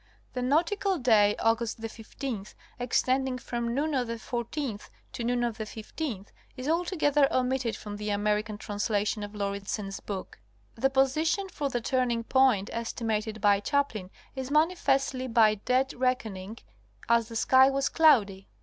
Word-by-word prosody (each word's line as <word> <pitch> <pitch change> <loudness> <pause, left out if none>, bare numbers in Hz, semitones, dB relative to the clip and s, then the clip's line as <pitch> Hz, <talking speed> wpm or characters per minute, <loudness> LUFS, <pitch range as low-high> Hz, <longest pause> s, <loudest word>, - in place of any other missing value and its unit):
—The 250 - -2
nautical 350 +9 +1
day 215 -6 +4
Aug. 225 +1 +2 0.3
15 225 -2 -6 0.3
extending 255 +1 +1
from 235 -1 -3
noon 300 +3 0
of 255 -3 0
the 230 - -3
14th 235 0 -4 0.2
to 240 - -4
noon 240 +1 0
of 235 -2 -2
the - - -1
15th 220 - -6 0.3
is 255 +2 -5
altogether 305 -4 +2
omitted 255 -2 0
from 205 -1 -7
the 210 0 -4
American 210 +1 0
translation 205 +1 -1
of 205 0 -6
Lauridsen's 200 0 -3
book. 190 - -7 0.3
The 265 +4 +1
position 310 +8 +1
for 290 -5 -3
the 245 -2 -2
turning 245 -2 0
point 250 -6 +3
estimated 220 -2 -3
by 205 0 +4
Chaplin 215 -5 -1 0.3
is 265 -1 -4
manifestly 280 -4 +1
by 225 -3 +5
dead 255 +6 0
reckoning, 225 -5 -2 0.5
as 235 -1 +3
the 230 - -9
sky 260 +3 +5
was 275 0 0
cloudy. 210 - +3
240 Hz, 145 wpm, -28 LUFS, 210-270 Hz, 0.5 s, by